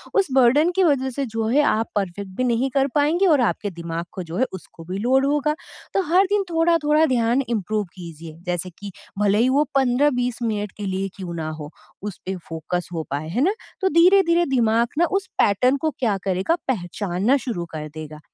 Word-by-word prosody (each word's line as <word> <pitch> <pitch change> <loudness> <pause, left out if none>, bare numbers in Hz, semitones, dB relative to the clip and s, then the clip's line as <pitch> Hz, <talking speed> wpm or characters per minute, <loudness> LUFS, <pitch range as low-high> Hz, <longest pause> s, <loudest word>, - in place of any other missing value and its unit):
उस 395 -2 +3
बर्डन 270 +7 +5
की 380 - +5
वजह 265 -4 +2
से 275 +2 -3
जो 225 -2 -2
है, 280 +6 +4
आप 225 -6 +1
परफेक्ट 200 0 -3
भी 255 - +1
नहीं 250 +2 +1
कर 275 0 +2
पाएँगे 305 +6 +3
और 300 -6 +4
आपके 205 - -5
दिमाग 170 0 -4
को 185 - -5
जो 165 +1 -6
है, 260 - +3
उसको 170 -2 -10
भी 190 - -2
लोड 260 +5 +2
होगा। 295 +1 +1 0.4
तो 390 - +2
हर 380 +2 +6
दिन 410 -1 +2
थोड़ा-थोड़ा 325 -2 +3
ध्यान 235 +3 +2
इम्प्रूव 210 -1 -1
कीजिए। 165 -3 -10
जैसे 180 +1 -2
कि 205 -1 -7 0.3
भले 205 0 +3
ही 245 +3 +4
वो 295 - +5
15-20 250 -2 +2
मिनट 210 -3 -2
के 210 - -5
लिए 190 0 -2
ही 195 - -2
क्यों 180 -3 -6
ना 155 -1 -3
हो, 155 -1 -7 0.3
उस 205 -2 -6
पे 190 +1 -2
फ़ोकस 165 +2 -3
हो 165 - -2
पाए, 145 +2 -3
है 230 +10 -1
ना? 380 +6 +3 0.3
तो 380 - +3
धीरे-धीरे 345 -1 +5
दिमाग 235 -2 +3
ना 345 - +4
उस 390 -1 -5
पैटर्न 250 +7 +3
को 315 - +1
क्या 220 -6 +1
करेगा, 190 - +1
पहचानना 200 +1 0
शुरू 230 -10 -4
कर 155 -1 -5
देगा। 155 -1 -8
230 Hz, 205 wpm, -22 LUFS, 185-285 Hz, 0.4 s, हर